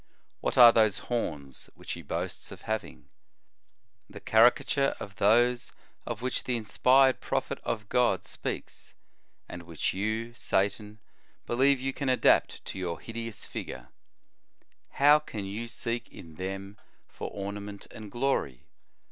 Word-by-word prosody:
What - - -2
are 120 -1 +11
those 110 -3 +3
horns 75 - -4
which - - -8
he 85 - -5
boasts 70 - -5
of - - -11
having? 110 0 -4 1.0
The - - -10
caricature 135 +4 +4
of 95 -2 -8
those 120 +5 +3 0.4
of 120 0 -4
which 130 - -2
the 125 -1 0
inspired 130 +4 +4
prophet - - -2
of 105 -2 -3
God 125 +2 +2
speaks, - - -6 0.5
and 85 - -8
which 85 -2 -2
you, 110 +4 -2
Satan, 105 -1 -1 0.5
believe 135 +3 +3
you 135 +1 -2
can 140 -1 -2
adapt 130 - +3
to 95 - -6
your 85 -2 -3
hide 115 - -10
ous 115 -2 -5
figure. - - -7 1.0
How 145 +2 +6
can 110 -9 -6
you 105 +4 -5
seek 115 0 -4
in 80 -2 -12
them 95 +3 -6 0.3
for - - -7
ornament 100 0 -6
and 105 -2 -10
glory? 100 - -1
110 Hz, 140 wpm, -29 LUFS, 100-125 Hz, 1.0 s, are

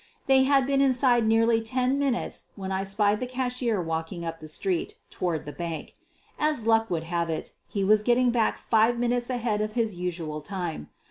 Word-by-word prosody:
/They 265 -1 +5
had 270 -1 +4
been 275 0 +2
inside 250 -3 +3
nearly 225 +1 +3
ten 255 +4 0
minutes 275 -4 -1
when 195 -1 -5
I 190 0 -1
spied 205 +1 +1
the 250 - -3
cashier 250 -3 -1
walking 165 +1 -3
up 165 0 -5
the 155 - -9
street 175 +3 -2 0.2
toward 170 -4 -2
the 145 - -6
bank. 170 0 -6 0.4
As 300 -7 +1
luck 225 0 +3
would 165 -2 -1
have 170 0 -2
it, 160 - -4
he 200 - -2
was 210 +2 +4
getting 245 +2 +3
back 230 -2 +1
five 225 +1 +2
minutes 240 0 0
ahead 235 -4 -1
of 215 0 -2
his 225 -3 0
usual 165 -4 -4
time. 170 - -5
220 Hz, 190 wpm, -26 LUFS, 175-245 Hz, 0.4 s, They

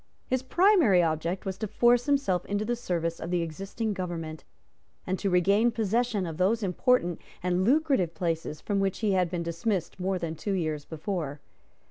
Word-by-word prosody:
His 255 -1 0
primary 320 - +4
object 165 +4 -1
was 190 0 -4
to 215 - -2
force 240 +4 +3
himself 275 -12 +1
into 205 +1 -1
the 240 +2 0
service 170 -7 -2
of 170 - -5
the 175 -1 +1
existing 195 +7 -4
government, 165 -4 -5 0.6
and 185 0 -2
to 200 - 0
regain 200 +6 +4
possession 225 -2 0
of 160 -2 -5
those 205 +5 +2
important 180 -1 +1 0.2
and 180 0 +1
lucrative 265 - +2
places 165 -4 -2
from 205 -2 -1
which 195 +1 -1
he 215 -2 +2
had 185 -2 +2
been 175 -1 -2
dismissed 170 +2 -2
more 190 +1 0
than 170 -3 -3
two 195 +5 -3
years 155 -5 -2
before. 160 -3 -4
185 Hz, 175 wpm, -28 LUFS, 170-220 Hz, 0.6 s, primary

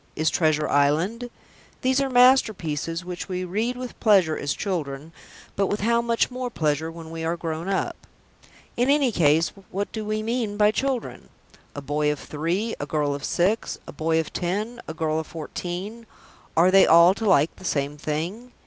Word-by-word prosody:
_ - - -36
Is 155 +1 +1
Treasure 155 -2 +1
Island? 165 +13 +1 0.5
These 260 +1 +2
are 275 - 0
masterpieces 185 - +3
which 180 +1 -6
we 185 0 -2
read 220 +7 -2
with 250 -1 -7
pleasure 190 -8 +4
as 145 0 -2
children, 160 -5 -4 0.4
but 195 0 +1
with 205 - -2
how 235 +2 +2
much 235 +1 +1
more 250 0 -4
pleasure 160 -5 -1
when 165 -1 -10
we 165 0 -5
are 165 +1 -1
grown 165 +2 -4
up. 195 - -1 0.8
In 245 +3 +1
any 280 -3 +3
case 160 -3 +3 0.2
what 200 +2 -3
do 220 - -4
we 215 0 -2
mean 225 -2 -2
by 210 0 +5
"children"? 260 +2 -3 0.5
A 145 - -6
boy 150 +1 0
of 150 - -3
three, 175 +9 -2
a 145 - -4
girl 145 -1 0
of 140 -1 -6
six, 195 +6 0
a - - -8
boy 160 +2 +1
of 160 - -4
ten, 210 +7 -3
a 160 - -5
girl 160 -1 0
of 160 - -6
fourteen 180 +7 -6 0.5
are 175 +3 +5
they 195 0 +6
all 170 +3 +7
to 220 +3 -5
like 155 -3 +3
the - - -14
same 145 -4 -1
thing? 170 +12 -4
180 Hz, 185 wpm, -24 LUFS, 155-225 Hz, 0.8 s, all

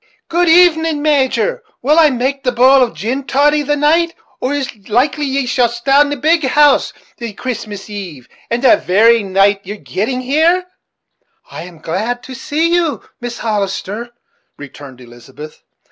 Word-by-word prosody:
Good 345 +1 +1
even, 325 -3 +3
Major; 305 - +1 0.2
will 300 +5 +3
I 315 -2 +6
make 270 +2 -2
the 250 - +1
bowl 260 +3 +5
of 245 -2 0
gin 255 +6 -3
toddy 290 +4 +2
the 295 +1 -1
night, 325 +4 +1 0.2
or 255 - -2
it's 275 -4 -3
likely 275 +6 0
ye'll 255 -2 +1
stay 235 +3 -4
at 290 +1 +5
the 290 - -2
big 315 +4 +2
house 290 +2 +3 0.3
the 230 -3 -6
Christmas 210 -4 -6
eve, 180 - -8 0.2
and 235 +2 -2
the 310 +4 +6
very 225 +4 +3
night 195 +1 +2
of 200 - -34
yer 205 - -5
getting 215 - -4
there?" 330 +6 +2 0.9
"I - - -8
am 175 -2 -13
glad 210 +10 -4
to 260 - -9
see 310 +6 -1
you, 330 - 0 0.2
Mrs. 240 -1 -6
Hollister," 210 +1 -3 0.5
returned 140 -2 -12
Elizabeth. 125 +5 -13
255 Hz, 160 wpm, -15 LUFS, 210-295 Hz, 0.9 s, I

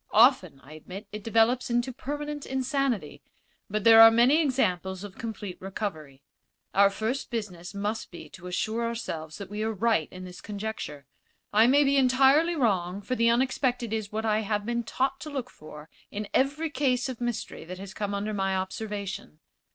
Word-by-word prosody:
Often, 210 - +4
I 145 - -13
admit, 185 +6 -9
it 210 -1 -7
develops 225 +3 +2
into 240 +2 0
permanent 290 +2 -5
insanity, 265 - -1 0.5
but 210 0 -2
there 225 0 +9
are 225 - +11
many 245 +8 +5
examples 190 - 0
of 205 -2 -10
complete 210 -5 -6
recovery. 160 -8 -5 0.5
Our 200 0 +6
first 220 +7 -3
business 200 -6 -5
must 210 +2 -3
be 170 -3 -10
to 180 - -11
assure 220 +6 -1
ourselves 220 -10 -4
that 200 -1 -8
we 210 +1 -4
are 220 +1 0
right 215 -6 +1
in 185 0 -9
this 180 -1 -10
conjecture. 205 -9 -6 0.5
I 220 +3 +6
may 285 +3 +5
be 280 0 +3
entirely 270 +6 +4
wrong, 195 - 0
for 255 - -3
the 230 -2 +3
unexpected 245 -1 +1
is 215 -2 -3
what 220 +1 -2
I 215 -1 +2
have 210 -1 -1
been 235 +1 -1
taught 265 +3 -1
to 305 - -7
look 265 -4 -5
for 150 0 -12 0.2
in 210 0 -5
every 295 +4 +1
case 260 -2 +1
of 255 -2 -6
mystery 240 -2 -3
that 180 +2 -7
has 190 0 -9
come 205 0 -3
under 210 +2 -2
my 195 -1 0
observation. 195 -2 -5
220 Hz, 180 wpm, -27 LUFS, 195-250 Hz, 0.5 s, are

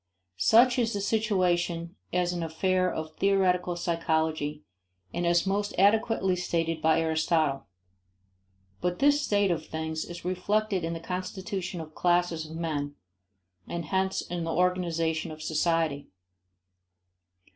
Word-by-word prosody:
Such 245 - +5
is 230 -1 +1
the 205 - -1
situation 180 -5 0 0.2
as 180 0 +1
an 175 - -3
affair 185 +3 +1
of 155 -1 -5
theoretical 185 -3 +2
psychology 160 -3 -1 0.5
and 175 0 -1
as 170 +1 +3
most 205 +1 -1
adequately 205 -1 +3
stated 165 -2 -1
by 160 +1 +4
Aristotle. 160 -3 +1 1.1
But 180 0 -1
this 290 +1 +4
state 205 -7 +2
of 160 -2 -2
things 160 0 -3
is 175 0 -9
reflected 195 +1 0
in 165 +1 -2
the 165 - -4
constitution 185 +1 -4
of 155 -1 -10
classes 175 -2 +1
of 160 - -8
men 145 -4 -3 0.7
and 170 -1 -4
hence 190 +4 0
in 175 -1 -4
the 165 - -2
organization 170 -3 0
of 155 0 -8
society. 155 -2 0
175 Hz, 130 wpm, -28 LUFS, 160-190 Hz, 1.1 s, Such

